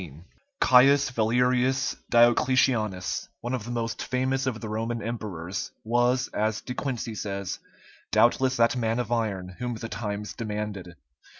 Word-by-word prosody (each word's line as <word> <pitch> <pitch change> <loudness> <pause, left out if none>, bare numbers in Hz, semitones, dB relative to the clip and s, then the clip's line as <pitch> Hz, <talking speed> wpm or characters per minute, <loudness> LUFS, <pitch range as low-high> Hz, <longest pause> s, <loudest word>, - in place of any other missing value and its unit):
[TN]] 80 -2 -11 0.4
Caius 135 +2 +5
Valerius 125 +3 +2 0.2
Diocletianus, 120 -4 +3
one 120 +2 -3
of 120 -5 -3
the - - -7
most 115 -1 -3
famous 130 +1 -1
of 115 -4 -2
the 110 - -6
Roman 115 +2 -2
emperors, 100 -6 -4
was, 120 +3 +2
as 110 0 -1
De 125 - -6
Quincey 125 -3 -3
says, 100 -3 -4 0.5
"doubtless 130 0 +3
that 115 +2 +3
man 115 -2 0
of 120 -2 -3
iron 105 -6 -1
whom 125 -1 -3
the 115 +1 -6
times 105 -1 -4
demanded." 105 -5 -5
115 Hz, 140 wpm, -26 LUFS, 105-125 Hz, 0.5 s, Caius